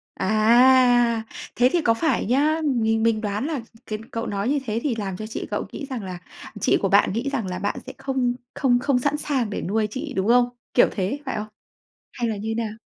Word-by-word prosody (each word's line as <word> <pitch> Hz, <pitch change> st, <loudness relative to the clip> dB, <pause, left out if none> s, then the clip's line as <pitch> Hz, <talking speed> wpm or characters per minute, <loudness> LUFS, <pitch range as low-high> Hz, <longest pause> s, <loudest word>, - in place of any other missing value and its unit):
À! 240 Hz, +2 st, +4 dB, 0.3 s
Thế 250 Hz, +1 st, +4 dB
thì 345 Hz, -, +2 dB
có 230 Hz, -5 st, +3 dB
phải 320 Hz, +8 st, 0 dB
nhá, 295 Hz, +8 st, +2 dB
mình 225 Hz, -1 st, +1 dB
mình 225 Hz, -1 st, +2 dB
đoán 210 Hz, +4 st, -2 dB
là 300 Hz, -6 st, -2 dB, 0.2 s
cái 215 Hz, 0 st, -4 dB
cậu 230 Hz, 0 st, -3 dB
nói 200 Hz, +4 st, -2 dB
như 290 Hz, 0 st, +2 dB
thế 220 Hz, 0 st, -1 dB
thì 265 Hz, -6 st, 0 dB
làm 195 Hz, -4 st, -4 dB
cho 215 Hz, -, -6 dB
chị 225 Hz, -, -5 dB
cậu -, -, -2 dB
nghĩ 280 Hz, -, -6 dB
rằng 245 Hz, -6 st, -4 dB
là 180 Hz, -2 st, -6 dB, 0.4 s
chị -, -, +3 dB
của -, -, +1 dB
bạn -, -, +4 dB
nghĩ 245 Hz, +5 st, -1 dB
rằng 230 Hz, -8 st, -2 dB
là 180 Hz, 0 st, -4 dB
bạn 205 Hz, -, -2 dB
sẽ -, -, -7 dB
không 260 Hz, -3 st, -1 dB, 0.2 s
không 245 Hz, -3 st, +2 dB
không 275 Hz, -2 st, +1 dB
sẵn 285 Hz, +3 st, 0 dB
sàng 265 Hz, -8 st, -1 dB
để -, -, -4 dB
nuôi 215 Hz, +3 st, 0 dB
chị, 275 Hz, +3 st, -5 dB
đúng 190 Hz, +2 st, 0 dB
không? 245 Hz, +1 st, +4 dB, 0.2 s
Kiểu 245 Hz, -, +6 dB
thế, 205 Hz, +8 st, -2 dB
phải 265 Hz, -, -3 dB
không? 210 Hz, -, -4 dB, 0.7 s
Hay 240 Hz, -2 st, -2 dB
là 215 Hz, -, -2 dB
như 220 Hz, +2 st, -3 dB
thế 230 Hz, -, 0 dB
nào? 215 Hz, -, -4 dB
235 Hz, 235 wpm, -23 LUFS, 215-265 Hz, 0.7 s, Kiểu